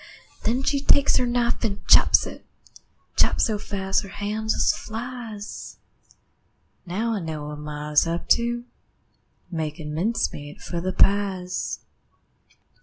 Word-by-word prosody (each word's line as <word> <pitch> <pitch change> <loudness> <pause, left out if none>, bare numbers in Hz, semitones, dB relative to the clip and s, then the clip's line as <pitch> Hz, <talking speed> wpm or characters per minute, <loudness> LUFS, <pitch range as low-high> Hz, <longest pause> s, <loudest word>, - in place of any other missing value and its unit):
Then 245 +4 +1
she 275 0 +1
takes 285 0 +5
her 250 - +2
knife 240 0 0
an' 205 -3 -1
chops - - +7
it, - - -9 0.7
Chops - - +4
so 215 -3 -1
fast 195 -2 -1
her 195 - -9
hand 210 +2 -4
jest - - +3
flies. 225 -2 -7 1.1
Now 220 +6 -1
I 215 - -1
know 155 -4 -5
what 150 0 -7
ma 150 0 -6
is 150 +2 +4
up 170 +1 -3
to 240 0 +2 0.9
Makin' 155 -2 -4
mincemeat 155 -5 -2
for 170 -1 -4
the 185 +2 -1
pies. 190 -2 +1
200 Hz, 130 wpm, -24 LUFS, 165-230 Hz, 1.1 s, chops